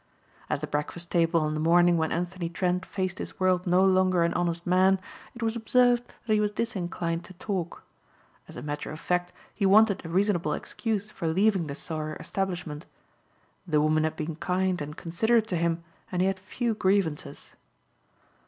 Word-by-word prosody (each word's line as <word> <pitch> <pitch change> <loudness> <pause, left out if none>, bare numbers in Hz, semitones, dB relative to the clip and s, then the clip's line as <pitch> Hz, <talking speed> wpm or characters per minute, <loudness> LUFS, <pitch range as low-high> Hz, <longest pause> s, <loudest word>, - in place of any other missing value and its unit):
At - - -1
the - - -1
breakfast 155 +4 -4
table 165 -1 +3
on 155 0 0
the 155 - -2
morning 175 +2 +5
when 160 -1 0
Anthony 175 0 -2
Trent 180 +1 -1
faced 185 -2 -3
his - - -7
world 185 -1 +2
no 180 +2 +4
longer 185 -2 +3
an 170 - +1
honest 170 -1 -1
man, 185 +2 +4 0.4
it 240 - -6
was 225 0 0
observed 245 +1 +2
that 220 - +1
he 215 - +3
was 210 0 +2
disinclined 175 -6 -2
to 185 - -12
talk. 180 -2 -4 0.6
As - - -12
a - - -7
matter 145 0 -4
of 155 - -7
fact 180 +1 -1 0.2
he 205 - -4
wanted 200 +1 +5
a 165 - -7
reasonable 180 -3 +1
excuse 215 +2 -3
for 165 - -4
leaving 190 0 +2
the 140 - -5
Sauer 155 0 -4
establishment. 175 -5 -4 0.8
The 155 -3 +2
woman 155 +1 +3
had 155 0 -1
been 155 0 -4
kind 185 0 0
and 150 +1 -6
considerate 220 +7 +1
to 180 - 0
him 170 0 0 0.3
and 180 - -1
he - - +3
had 195 -1 -1
few 230 +4 -2
grievances. 185 -8 -1
180 Hz, 180 wpm, -27 LUFS, 165-195 Hz, 0.8 s, morning